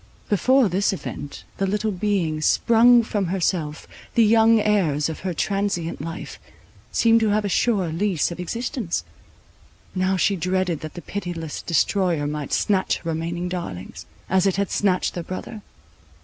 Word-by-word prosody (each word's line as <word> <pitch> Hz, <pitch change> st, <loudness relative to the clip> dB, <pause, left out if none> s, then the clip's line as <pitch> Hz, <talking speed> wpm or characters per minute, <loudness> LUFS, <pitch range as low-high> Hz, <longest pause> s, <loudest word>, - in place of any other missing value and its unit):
Before 255 Hz, +5 st, +4 dB
this 195 Hz, +2 st, +1 dB
event, 145 Hz, -6 st, -7 dB
the 195 Hz, -, 0 dB
little 210 Hz, +2 st, 0 dB
beings, 180 Hz, -6 st, -1 dB
sprung 235 Hz, +1 st, +5 dB
from 205 Hz, -4 st, -1 dB
herself, 170 Hz, -4 st, -1 dB, 0.3 s
the 230 Hz, -, +6 dB
young 225 Hz, +1 st, +5 dB
heirs 170 Hz, -9 st, +1 dB
of 160 Hz, -, -6 dB
her 185 Hz, -, -3 dB
transient 195 Hz, -1 st, -1 dB
life, 165 Hz, +1 st, -7 dB, 0.5 s
seemed 230 Hz, 0 st, +4 dB
to 220 Hz, -1 st, +1 dB
have 210 Hz, 0 st, +1 dB
a -, -, -1 dB
sure 195 Hz, -4 st, +1 dB
lease 175 Hz, 0 st, 0 dB
of 170 Hz, -, -7 dB
existence; 230 Hz, -, -3 dB, 0.9 s
now 185 Hz, 0 st, +1 dB
she 195 Hz, +3 st, +2 dB
dreaded 180 Hz, -2 st, -1 dB
that 155 Hz, -, -8 dB
the 175 Hz, -, -8 dB
pitiless 175 Hz, -6 st, -5 dB
destroyer 170 Hz, -2 st, +1 dB
might 150 Hz, -1 st, -4 dB
snatch 195 Hz, -2 st, +1 dB
her 165 Hz, -, -4 dB
remaining 170 Hz, +2 st, -3 dB
darlings, 175 Hz, -, -6 dB, 0.2 s
as 190 Hz, +1 st, +2 dB
it 190 Hz, -, +1 dB
had 200 Hz, -1 st, -1 dB
snatched 185 Hz, -3 st, +1 dB
their 175 Hz, -, -4 dB
brother. 185 Hz, +5 st, -7 dB
185 Hz, 155 wpm, -23 LUFS, 170-210 Hz, 0.9 s, the